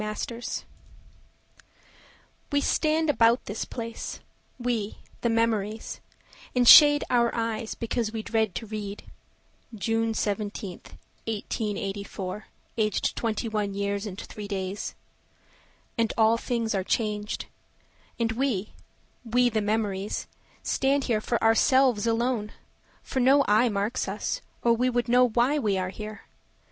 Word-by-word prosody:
Edith 215 0 -4
Conant 235 0 -5 1.9
We 285 - +3
stand 315 +2 +1
about 235 -2 +3
this 205 +2 -4
place—we, 230 -1 -5 0.2
the 235 - +1
memories; 225 -2 0 0.6
And 245 -1 +3
shade 290 +1 +10
our 235 -1 +4
eyes 225 -1 -2
because 230 -1 -2
we 220 -1 -4
dread 220 -4 0
to 230 - -4
read: 205 -2 -6 0.7
"June 225 +1 0
17th, 205 -3 -4 0.3
1884, 205 -2 -4 0.3
aged 215 -2 +1
21 215 -3 -2
years 200 +1 -2
and 195 -1 -7
3 210 -1 -7
days." 195 0 -4 1.0
And 230 -1 +2
all 225 0 +5
things 235 -3 -1
are 190 -2 0
changed. 210 0 -1 0.7
And 230 -1 +1
we—we, 245 +1 -2
the 220 -2 0
memories, 205 -2 -1 0.4
stand 275 +1 +1
here 225 -5 0
for 235 +1 0
ourselves 235 0 +4
alone, 230 -2 0 0.5
For 265 - -3
no 275 +3 +5
eye 220 +4 +4
marks 205 +2 -1
us, - - -3 0.2
or 235 - +5
would 245 0 +1
know 250 +1 +5
why 245 +6 +2
we 205 -7 +1
are 185 -1 -1
here. 215 +2 -8
225 Hz, 120 wpm, -27 LUFS, 210-240 Hz, 1.9 s, shade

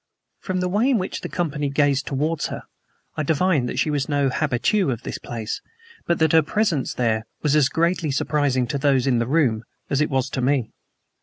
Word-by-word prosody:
From 185 -1 -2
the 180 - 0
way 210 +8 +2
in 260 - +3
which 185 -2 -3
the - - -5
company 150 -5 -2
gazed 140 -1 +1
towards 150 +4 -1
her, - - -6 0.5
I - - -1
divined 155 -3 +1
that - - -5
she 155 - +1
was 145 -1 -1
no 140 -2 +2
habitue 155 - +1
of 120 -2 -3
the - - -5
place, 110 -2 -5 0.5
but 170 - +2
that 160 -2 +3
her 160 - +7
presence 160 -3 0
there 110 -2 0 0.2
was 150 -1 +2
as 145 -3 +4
greatly 170 -1 0
surprising 140 -2 +1
to 140 - -1
those 135 -3 +2
in 125 -3 +2
the 115 - -1
room 130 -7 +2 0.3
as 140 +1 +2
it 150 - +1
was 135 -1 -1
to 130 - -2
me. 130 -3 +1
145 Hz, 210 wpm, -23 LUFS, 130-160 Hz, 0.5 s, her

